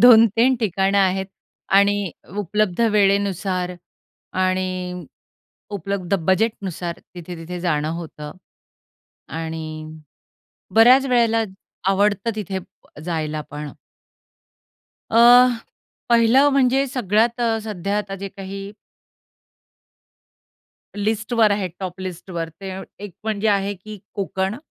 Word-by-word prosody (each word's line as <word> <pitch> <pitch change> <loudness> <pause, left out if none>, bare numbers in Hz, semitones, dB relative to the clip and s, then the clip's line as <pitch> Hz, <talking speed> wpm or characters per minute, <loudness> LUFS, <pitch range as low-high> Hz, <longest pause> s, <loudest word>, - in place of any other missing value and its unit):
2-3 230 +1 +7
ठिकाणं 195 -1 +1
आहेत. 190 0 +2 0.4
आणि 200 -1 +3 0.3
उपलब्ध 205 0 0
वेळेनुसार 195 -3 +1 0.7
आणि 185 0 +1 1.0
उपलब्ध 200 -1 -2
बजेटनुसार 190 -4 0 0.2
तिथे-तिथे 175 0 -7
जाणं 155 -4 0
होतं 150 -3 -8 1.1
आणि 160 0 -4 1.1
बऱ्याच 250 +4 +7
वेळेला 230 -3 +3 0.5
आवडतं 205 +3 +1
तिथे 195 -3 -3
प 175 - -18
जायला 155 -3 -2
पण. 150 0 -6 1.4
अ, - - +1 0.9
पहिलं 235 +4 +5
म्हणजे 270 0 +3
सगळ्यात 235 -1 +1
अ, 230 -2 +1
सध्या 200 -1 -2
आता 200 -2 -4
जे 195 +1 -6
काही 195 0 -7 2.3
लिस्टवर 220 +2 +1
आहे 200 -2 -1
टॉप 185 -1 -5
लिस्टवर 175 -2 -5
ते 195 -1 -6 0.3
एक 205 - -8
म्हणजे 220 -1 0
आहे 200 0 +1
की 210 +3 -10 0.2
कोकण, 190 0 -2
200 Hz, 95 wpm, -22 LUFS, 185-220 Hz, 2.3 s, 2-3